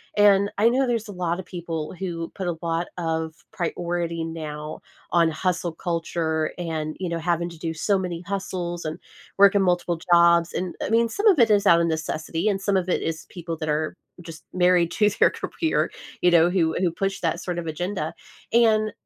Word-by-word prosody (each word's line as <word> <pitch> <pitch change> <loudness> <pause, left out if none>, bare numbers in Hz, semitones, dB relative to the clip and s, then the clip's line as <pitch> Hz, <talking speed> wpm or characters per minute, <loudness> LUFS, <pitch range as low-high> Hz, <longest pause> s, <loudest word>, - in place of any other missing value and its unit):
And 200 -1 +5
I 225 +3 +6
know 260 +3 +2
there's 230 -3 -1
a - - -7
lotta 180 -1 -2
people 170 -3 -5
who 170 -3 -4
put 190 - -4
a 175 - -1
lot 170 0 -1
of 160 -1 -2 0.2
priority 170 -1 -2
now 155 -2 -6 0.3
on 170 -2 +4
hustle 180 +1 -1
culture 165 -2 -1
and, 160 -3 -3
you 185 -2 -2
know, 170 - -2
having 170 +1 -1
to 170 - -12
do 165 0 -3
so 195 +5 +1
many 180 -3 -4
hustles 180 -3 -4
and 155 +2 -4 0.4
work 200 +1 +7
in 200 - +4
multiple 175 -2 +1
jobs, 170 -1 +5
and, 180 -1 -3
I - - -2
mean, 230 +1 +3
some 405 - -3
of 375 -8 +6
it 235 - +6
is 205 -1 +3
out 170 -3 +6
of 170 - +2
necessity, 160 +2 -2
and 195 -2 +1
some 195 0 +1
of 185 -1 -1
it - - +1
is 160 -1 -3
people 170 -2 -6
that 155 -1 -4
are 155 +1 -1 0.2
just 165 -1 -10
married 180 -2 +3
to 210 -1 +3
their - - +5
career, 320 -2 -1 0.3
you 180 - +5
know, 170 -1 +5
who 170 -3 +1
who 180 -2 +1
push 195 +3 -2
that 170 +1 -1
sort 180 -1 -4
of 175 - -3
agenda 165 +1 -3 0.4
and 220 -2 +4
175 Hz, 200 wpm, -24 LUFS, 165-195 Hz, 0.4 s, work